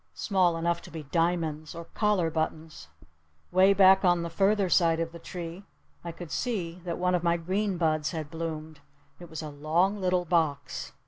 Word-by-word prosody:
Small 185 -4 +1
enough 170 +1 0
to - - -12
be 160 -2 -7
diamonds. 165 0 -1
Or 170 0 -7
collar 195 -4 0
buttons. 155 - -4 0.6
'Way 185 +2 +5
back 190 0 +6
on 175 -2 +3
the 170 - -5
further 195 +2 +2
side 165 -2 +3
of 165 0 -2
the 170 - -10
tree 175 +1 -7 0.4
I 170 - -5
could 165 -1 -10
see 180 -8 -3
that 170 -2 -3
one 180 0 +1
of 180 - +2
my 170 0 +2
green 190 +3 -1
buds 155 -2 +1
had 160 -3 -5
bloomed. 160 -2 -5 0.4
It 175 -1 -11
was 160 -1 -6
a 155 - -5
long 165 +8 +1
little 180 -1 +1
box. 160 -4 -1
170 Hz, 185 wpm, -28 LUFS, 160-180 Hz, 0.6 s, back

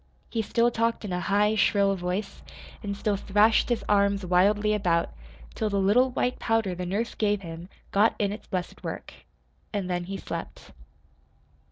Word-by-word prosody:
He 225 - 0
still 235 +2 +2
talked 230 -1 0
in 190 - -4
a 180 - -1
high, 205 +3 +2
shrill 200 -1 +3
voice, 180 +3 -4 0.4
and 200 -2 -4
still 205 -1 0
thrashed 210 +4 +3
his 240 -2 -1
arms 200 -1 +2
wildly 205 +4 +3
about, 175 -5 +1 0.4
till 215 - -1
the 200 - -1
little 220 +7 +4
white 250 0 -1
powder 225 -5 +1
the 180 0 -5
nurse 210 +6 -2
gave 210 -2 0
him 165 +1 -8 0.2
got 210 +3 +3
in 200 -1 0
its 210 - -8
blessed 180 -1 -4
work. - - -6 0.6
And 190 -3 -2
then 175 0 -1
he 195 +2 -5
slept. - - -7
200 Hz, 170 wpm, -27 LUFS, 185-215 Hz, 0.6 s, little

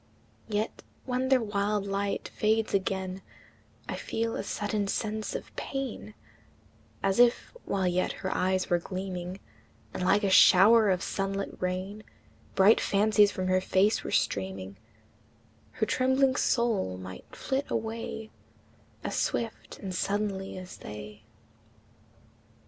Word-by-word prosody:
Yet 215 +1 -2 0.2
when 255 0 -1
their 260 -3 +4
wild 205 -1 0
light 200 0 -2
fades 220 +1 +1
again, 190 -1 -1 0.7
I - - -3
feel 230 0 -2
a - - -2
sudden 205 0 -2
sense 215 +1 -2
of - - -7
pain, 265 -5 -5 0.9
As 195 +2 +1
if, 245 - +3
while 190 -1 0
yet 180 0 +1
her 190 - 0
eyes 185 0 +1
were 175 - +2
gleaming, 185 0 -5 0.5
And - - -4
like 200 +3 +3
a 195 - +2
shower 210 +4 +7
of 185 -1 +1
sun 195 0 -2
lit 195 0 -4
rain 185 +3 -3 0.5
Bright 200 +3 +6
fancies 210 0 +4
from 185 - -3
her 185 0 +3
face 195 +3 +2
were - - -5
streaming, 95 0 -1 1.0
Her 215 - 0
trembling 260 +2 +2
soul 225 - +1
might 95 0 -10
flit 270 +2 -2
away 225 -1 -4 0.7
As - - -3
swift 230 -2 -2
and 190 -2 -6
suddenly 195 0 -2
as 185 0 -9
they. 105 0 -9
200 Hz, 130 wpm, -29 LUFS, 185-220 Hz, 1.0 s, shower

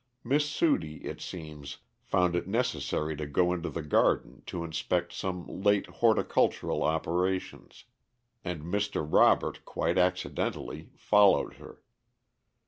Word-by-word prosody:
Miss 145 +4 +1
Sudie, 145 - 0
it - - -6
seems, 75 -5 -8 0.2
found 90 -1 +1
it 85 - -2
necessary 110 -8 -1
to 75 0 -4
go 90 +5 +2
into 85 -1 -3
the 85 - -5
garden 75 - +1
to 85 - -4
inspect 85 +2 -2
some 90 -2 -4
late 100 +1 +1
horticultural 115 -2 +1
operations, 90 +4 -2 0.6
and 85 -4 -4
Mr. 100 -1 -1
Robert, - - +3
quite - - -1
accidentally, 90 0 -1
followed 105 -2 +3
her. - - -14
90 Hz, 120 wpm, -29 LUFS, 80-100 Hz, 0.6 s, Robert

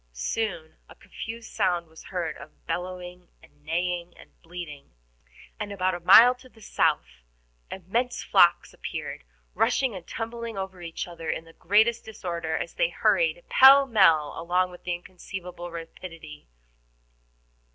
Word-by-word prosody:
Soon 160 - -3
a - - -14
confused 225 0 -9
sound 180 -5 +1
was 160 0 -15
heard 170 -4 -3
of 140 +2 -15
bellowing 180 0 -5 0.2
and 145 - -22
neighing 175 +2 -2
and - - -16
bleating, 165 - -9 0.6
and 210 -1 -4
about 185 -1 0
a 175 - -4
mile 230 +8 +8
to 255 +1 -18
the 225 - -21
south 155 - 0 0.5
immense 230 +7 -2
flocks 175 -3 +4
appeared, - - -6 0.3
rushing 260 - +1
and 180 -3 -9
tumbling 230 -1 -5
over 190 -2 -5
each 165 0 -5
other 170 -2 -7
in 165 - -3
the 165 - -16
greatest 220 +7 +2
disorder, 170 -6 -4
as - - -5
they - - +1
hurried - - +1
pell 275 +1 +8
mell 165 - +4
along 180 +2 0
with 180 - -15
inconceivable 180 0 -6
rapidity. 165 -2 -10
180 Hz, 140 wpm, -26 LUFS, 165-215 Hz, 0.6 s, mile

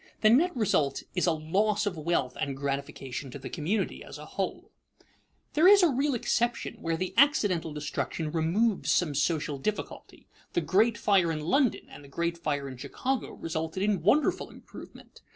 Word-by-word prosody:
The 215 - +6
net 310 +5 +3
result 185 - +1
is 180 -1 +1
a - - +4
loss 200 +7 0
of 200 -3 -2
wealth 155 -5 -1
and 135 -1 -2
gratification 140 -1 -4
to 125 - -8
the 135 - -8
community 185 +6 -2
as - - -10
a - - -10
whole. - - -4 0.8
There 315 +4 +5
is 400 -1 +8
a 345 - +6
real 275 +1 +1
exception 240 +1 -1
where 165 0 -1
the 185 +2 -3
accidental 205 - +3
destruction 150 +1 -3
removes 180 +7 +1
some 165 -5 +2
social 145 0 0
difficulty. 210 +9 -5 0.3
The - - +1
great 210 +8 +2
fire 190 -5 +3
in 155 -1 -3
London 230 - +2
and 145 - -12
the - - -13
great 170 +4 -2
fire 145 -4 -2
in 130 -2 -8
Chicago 260 - -3
resulted 160 +3 -3
in 205 -4 +1
wonderful 240 - +2
improvement. - - -13
170 Hz, 170 wpm, -28 LUFS, 150-215 Hz, 0.8 s, is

